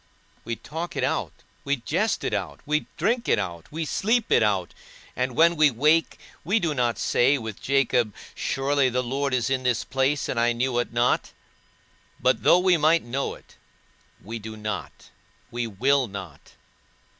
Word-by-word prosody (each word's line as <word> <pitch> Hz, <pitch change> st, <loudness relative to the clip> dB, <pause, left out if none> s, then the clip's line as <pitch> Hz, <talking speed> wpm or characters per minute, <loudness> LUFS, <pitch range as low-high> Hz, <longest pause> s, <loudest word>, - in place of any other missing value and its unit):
We 115 Hz, -, -3 dB
talk 165 Hz, +8 st, -6 dB
it -, -, -1 dB
out, -, -, -1 dB, 0.3 s
we 140 Hz, 0 st, +1 dB
jest 175 Hz, -, -1 dB
it -, -, -2 dB
out, 100 Hz, -4 st, -3 dB
we 150 Hz, 0 st, 0 dB
drink 235 Hz, +8 st, 0 dB
it -, -, +4 dB
out, 85 Hz, -4 st, -5 dB
we 160 Hz, +1 st, -3 dB
sleep 225 Hz, +8 st, 0 dB
it -, -, +5 dB
out; 100 Hz, -5 st, 0 dB, 0.4 s
and 125 Hz, -1 st, -2 dB
when 170 Hz, +3 st, +5 dB
we 155 Hz, -2 st, +5 dB
wake, 150 Hz, +6 st, +2 dB, 0.3 s
we 200 Hz, +8 st, +2 dB
do 165 Hz, -6 st, 0 dB
not 120 Hz, -4 st, 0 dB
say 135 Hz, +4 st, +3 dB
with 110 Hz, -5 st, -7 dB
Jacob, 130 Hz, -4 st, +2 dB, 0.2 s
Surely 135 Hz, 0 st, +1 dB
the 125 Hz, +1 st, -1 dB
Lord 135 Hz, +3 st, -2 dB
is 130 Hz, 0 st, 0 dB
in 130 Hz, -1 st, +1 dB
this 125 Hz, -2 st, 0 dB
place, 135 Hz, +2 st, 0 dB
and 115 Hz, -, -2 dB
I 120 Hz, 0 st, +3 dB
knew 120 Hz, +1 st, 0 dB
it 120 Hz, -, -2 dB
not: 120 Hz, +1 st, +1 dB, 0.9 s
but -, -, +2 dB
though -, -, +6 dB
we 180 Hz, -1 st, +3 dB
might 160 Hz, +2 st, +3 dB
know 130 Hz, +4 st, -3 dB
it, -, -, -20 dB, 0.7 s
we 115 Hz, +4 st, -6 dB
do 110 Hz, 0 st, -8 dB
not, 105 Hz, -2 st, -6 dB, 0.4 s
we 120 Hz, 0 st, -2 dB
will 130 Hz, +6 st, +2 dB
not. 95 Hz, -7 st, -10 dB
130 Hz, 175 wpm, -25 LUFS, 115-150 Hz, 0.9 s, though